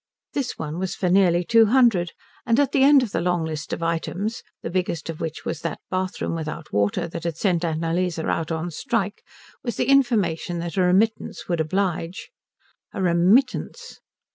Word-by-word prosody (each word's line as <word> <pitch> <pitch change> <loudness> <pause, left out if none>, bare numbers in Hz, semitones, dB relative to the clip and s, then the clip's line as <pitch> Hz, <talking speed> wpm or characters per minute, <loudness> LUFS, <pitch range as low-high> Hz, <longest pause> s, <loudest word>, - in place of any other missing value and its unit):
This 275 -4 -2
one 160 +2 -4
was 190 -1 -2
for 180 - 0
nearly 180 -2 +4
two 225 +4 +5
hundred; 220 -8 +3 0.3
and 230 +1 +2
at 285 - +2
the 275 - +2
end 275 -1 +7
of 225 - -4
the 165 - -1
long 175 -2 0
list 155 -2 -5
of 165 - -3
items, 175 +6 -2 0.2
the - - -4
biggest 170 -3 -2
of 155 - -10
which 160 -1 -5
was 160 - -3
that 165 -3 -3
bathroom 185 -1 -2
without 155 -3 -5
water 105 - +1
that 170 0 -7
had 170 -2 -3
sent 175 -3 +1
Annalise 165 +2 -1
out 160 0 -1
on 165 +2 -2
strike, 225 - -2 0.4
was 240 - -3
the - - +1
information 220 -11 +2
that 170 +1 -4
a 190 - +2
remittance 195 +5 +1
would 170 -2 -1
oblige. 175 +1 -2 0.6
A - - -3
remittance! 205 - +1
180 Hz, 180 wpm, -23 LUFS, 165-215 Hz, 0.6 s, end